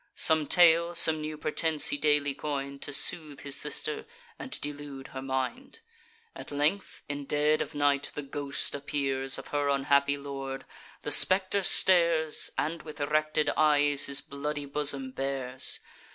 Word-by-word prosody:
Some 155 -2 +4
tale, 170 +1 +4
some 160 -2 +4
new 155 0 -5
pretence, 155 0 0
he 290 - -1
daily 145 - +1
coin'd, 140 -1 -5
To - - -6
soothe 150 0 0
his 140 -1 +1
sister, 435 - -3 0.3
and 260 - -6
delude 145 -2 -7
her 130 - -7
mind. 135 - -4 0.6
At - - -10
length, 150 +7 -2
in 145 -1 -5
dead 150 +2 +1
of - - -6
night, 145 -1 +1
the 145 - -5
ghost 140 0 -4
appears 135 -2 -2
Of - - -10
her 145 -1 -1
unhappy 140 +1 +2
lord: 135 -1 -7 0.4
the - - -3
spectre 190 +1 +4
stares, 170 -5 +3
And, 160 +1 -2
with 155 -1 -11
erected 155 +1 0
eyes, 145 -2 +4
his 140 0 0
bloody 145 +1 -5
bosom 140 -2 -1
bares. 130 -1 0
145 Hz, 150 wpm, -28 LUFS, 140-155 Hz, 0.6 s, Some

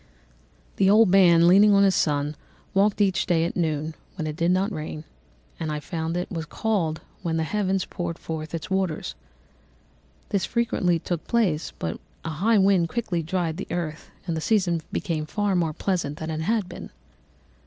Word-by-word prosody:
"The 190 - +4
old 215 0 +6
man, 175 -3 +6
leaning 200 +3 +7
on 200 - +5
his 195 -1 +4
son, 150 -2 0 0.4
walked 200 +2 +3
each 190 -2 +2
day 165 -2 +2
at 170 - -3
noon, 155 -2 -1 0.2
when 160 -5 -3
it 155 -1 -3
did 170 +1 +1
not 190 +3 +2
rain, 155 -3 -5 0.6
as 160 - -3
I 150 0 -2
found 165 +2 -3
it 180 - -3
was 165 -4 -4
called 175 -8 -1 0.2
when 165 -1 -1
the 160 - +1
heavens 190 +1 0
poured 170 -1 -4
forth 160 0 -5
its 165 +3 -6
waters. 185 - -1 1.2
This 200 -3 0
frequently 190 -6 +1
took 165 0 -4
place, 190 -10 +1
but 80 0 -4 0.3
a - - -2
high 200 +9 +2
wind 190 -4 +4
quickly 195 -8 -1
dried 165 0 -2
the 195 - -5
earth, 165 -3 -4 0.2
and 170 -3 -2
the 160 - -2
season 180 -5 +1
became 155 -3 -2
far 205 +2 0
more 170 -3 +1
pleasant 155 -3 -2
than 160 0 -4
it 155 0 -3
had 215 +3 0
been. 175 - -9
175 Hz, 180 wpm, -25 LUFS, 160-195 Hz, 1.2 s, leaning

